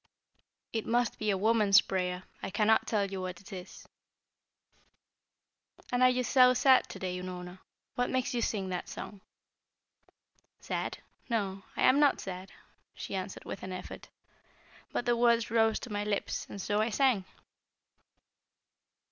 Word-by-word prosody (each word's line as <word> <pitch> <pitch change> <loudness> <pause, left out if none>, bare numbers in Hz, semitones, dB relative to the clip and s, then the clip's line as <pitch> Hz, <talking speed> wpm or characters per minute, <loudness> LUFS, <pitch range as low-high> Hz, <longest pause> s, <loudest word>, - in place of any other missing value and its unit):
"It 225 -2 -2
must 240 0 +1
be 215 - -1
a 195 - +2
woman's 210 -1 +5
prayer; 180 -2 -2 0.2
I - - -4
cannot 210 +2 +3
tell 200 -3 0
you 190 -1 -4
what 180 -1 -5
it 200 - -12
is." 185 0 -9 2.0
"And 245 0 +1
are 255 - +7
you 250 0 +1
so 255 0 +5
sad 260 0 +5
to - - -7
day, 185 -1 -3
Unorna? 180 0 -7 0.3
What 245 - 0
makes 255 -1 -1
you 240 - 0
sing 195 -4 -1
that 180 - -4
song?" 200 -2 -8 1.4
"Sad? - - -3 0.3
No, 200 -4 -2
I - - +1
am 275 - +6
not 290 -2 +4
sad," 185 0 -7 0.4
she - - -7
answered 190 0 -5
with - - -6
an 185 - -6
effort. 185 - -8 0.8
"But - - -2
the 240 -1 +3
words 235 -2 +3
rose 225 -1 +3
to 245 - -8
my 205 0 -1
lips 210 -1 -2
and 200 - -7
so 205 +2 0
I 220 - +1
sang." 235 -4 +2
210 Hz, 155 wpm, -31 LUFS, 190-240 Hz, 2.0 s, are